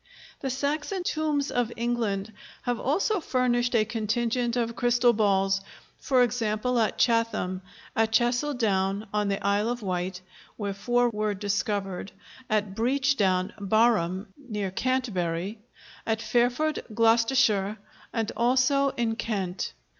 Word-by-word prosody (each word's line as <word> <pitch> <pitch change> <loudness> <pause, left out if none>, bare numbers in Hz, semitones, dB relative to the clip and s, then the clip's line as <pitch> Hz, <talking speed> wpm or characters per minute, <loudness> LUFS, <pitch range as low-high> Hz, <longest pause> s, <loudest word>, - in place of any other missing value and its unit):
The 270 - -3
Saxon 295 +8 -2
tombs 305 -4 0
of 245 -1 0
England 225 -3 -1 0.3
have 245 -2 -1
also 385 - +1
furnished 245 -4 +1
a 215 -2 +4
contingent 235 +2 -1
of 230 -1 -1
crystal 240 0 +3
balls, 195 -2 +2 0.4
for 255 -2 +3
example 235 +1 0
at 220 - +1
Chatham, 230 -6 +1 0.3
at 225 0 +2
Chassel 245 +5 +2
Down 200 -3 0
on 210 -1 +1
the 200 0 0
Isle 205 +2 +2
of 240 -2 -3
Wight, 180 -1 -2 0.4
where 200 -2 -3
four 240 +4 +1
were 210 -1 -1
discovered, 200 -1 -2 0.4
at 210 -3 0
Breach 270 +5 +1
Down, 185 -3 +1
Barham, 200 -3 +1
near 210 -9 -4
Canterbury, 200 -5 -1 0.5
at 220 -1 +1
Fairford, 245 +7 +1
Gloucestershire, 225 -3 +3 0.3
and 225 -2 -1
also 260 +3 +3
in 230 -2 0
Kent. 195 -5 -3
230 Hz, 125 wpm, -27 LUFS, 200-245 Hz, 0.5 s, a